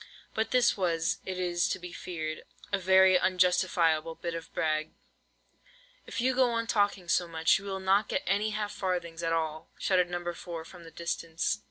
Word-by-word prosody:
But 220 0 -1
this 250 -2 +4
was, 175 0 0
it 185 -1 -3
is 175 -1 0
to - - -1
be 180 -1 -9
feared, 155 -3 -5 0.3
a 200 - +2
very 190 0 +6
unjustifiable 180 -3 +2
bit 170 0 -4
of 165 -1 -7
brag. 155 0 -1 1.1
"If - - -5
you 255 +2 +2
go 255 -1 +3
on 230 -1 -1
talking 205 -5 +1
so 175 +1 +2
much, 165 +1 +2
you 200 - -12
will 195 -1 -3
not 195 +2 +2
get - - -1
any 205 +3 +1
half 210 -1 -3
farthings 175 -4 -3
at 165 -1 -1
all!" 160 -1 -2
shouted 180 -2 +2
No. 175 0 -3
4, 170 -2 -7
from 175 0 -13
the - - -10
distance. 165 0 -2
180 Hz, 185 wpm, -29 LUFS, 165-195 Hz, 1.1 s, very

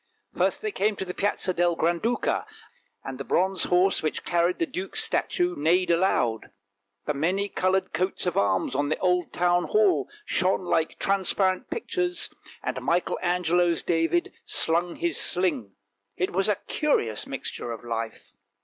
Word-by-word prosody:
First - - 0
they 430 - -1
came 210 - 0
to 190 - -4
the 180 - -5
Piazza 195 -2 0
del 175 -1 +2
Granduca, 195 - 0 0.6
and 135 -1 -6
the - - -3
bronze 190 +6 +1
horse 180 +2 +3
which 155 - -2
carried 175 +1 +1
the 165 - +1
duke's 185 +3 -3
statue 175 0 0
neighed 170 +5 +2
aloud. 165 - +1 0.6
The 150 - 0
many 180 +8 0
coloured 190 -1 0
coats 185 +1 -1
of 180 - -1
arms 95 -2 +1
on 145 +2 0
the 155 - 0
old 180 -2 +1
Town 175 0 +2
Hall 425 -4 +2 0.2
shone 185 - +1
like 165 -2 0
transparent 190 +2 +1
pictures, 360 -5 -2 0.3
and - - -3
Michael 175 +1 0
Angelo's 175 -1 +2
David 165 0 +1
slung 170 +1 +1
his 345 -1 0
sling; 145 - 0 0.4
it 185 - 0
was 195 +3 +1
a 210 - +3
curious 120 - 0
mixture 120 - -5
of 115 -1 -7
life 115 -1 -5
180 Hz, 155 wpm, -26 LUFS, 165-190 Hz, 0.6 s, horse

